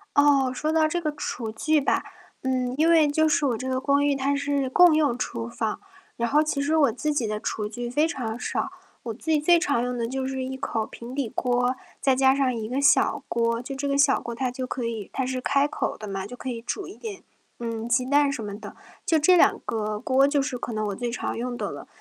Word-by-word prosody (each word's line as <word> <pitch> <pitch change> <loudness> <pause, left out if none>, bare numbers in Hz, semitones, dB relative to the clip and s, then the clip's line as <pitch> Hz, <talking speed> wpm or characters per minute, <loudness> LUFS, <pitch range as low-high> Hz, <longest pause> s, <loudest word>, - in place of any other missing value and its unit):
哦， 285 -2 +4
说 305 +4 -1
到 315 -1 +3
这 345 +3 -2
个 305 - -1
厨 225 -3 -4
具 305 +7 +1
吧， 275 - +1 0.4
呃， 260 - -2 0.3
因 320 +2 +3
为 325 -2 +6
就 315 +2 +2
是 320 -1 +2
我 240 -4 0
这 260 +3 -5
个 260 0 -1
公 280 +1 +2
寓， 285 -1 +2
它 275 +1 0
是 280 -1 0
共 345 +3 +6
用 290 -6 +2
厨 115 - -3
房， 220 - -3 0.3
然 235 0 -1
后 295 +4 +4
其 305 -2 -1
实 295 +3 +1
我 285 -6 +4
自 300 +6 -2
己 250 -6 0
的 210 0 -2
厨 215 -1 -3
具 240 +3 -5
非 295 +6 +2
常 240 -7 -4
少。 - - -2 0.3
我 230 - -4
自 265 +8 -8
己 310 -1 +4
最 340 +3 +5
常 285 -9 +1
用 250 0 -2
的 230 - -1
就 265 +2 -3
是 265 -1 -3
一 265 +1 -5
口 245 -5 -2
平 235 +2 -9
底 270 -4 -2
锅， 245 +2 0 0.3
再 265 -1 +3
加 265 0 +5
上 265 -3 +1
一 220 -2 -4
个 260 +4 -1
小 280 - +4
锅。 230 0 0
就 270 +2 -6
这 280 +1 -3
个 280 - 0
小 280 - +4
锅， 235 - -5
它 255 +2 -1
就 255 +1 -4
可 250 -1 -4
以 225 -4 -4
它 265 - -1
是 255 0 -2
开 280 +2 +2
口 - - -3
的 215 - -8
嘛， 195 -1 -4
就 235 +5 -8
可 260 - -6
以 235 -2 -4
煮 385 - -4
一 380 - -10
点， 425 -4 -7 0.4
嗯， 230 -1 -4
鸡 240 +1 +2
蛋 285 +1 +3
什 250 - -4
么 205 -1 -5
的。 210 -1 -10 0.3
就 320 - +3
这 360 +5 +5
两 - - +4
个 215 -1 -2
锅， 260 +3 +3
就 285 0 +2
是 270 -2 -3
可 240 - -5
能 215 -1 -1
我 200 - -3
最 240 +1 -3
常 240 - -3
用 245 +1 -3
的 - - -3
了。 - - -9
260 Hz, 275 characters per minute, -25 LUFS, 235-290 Hz, 0.4 s, 为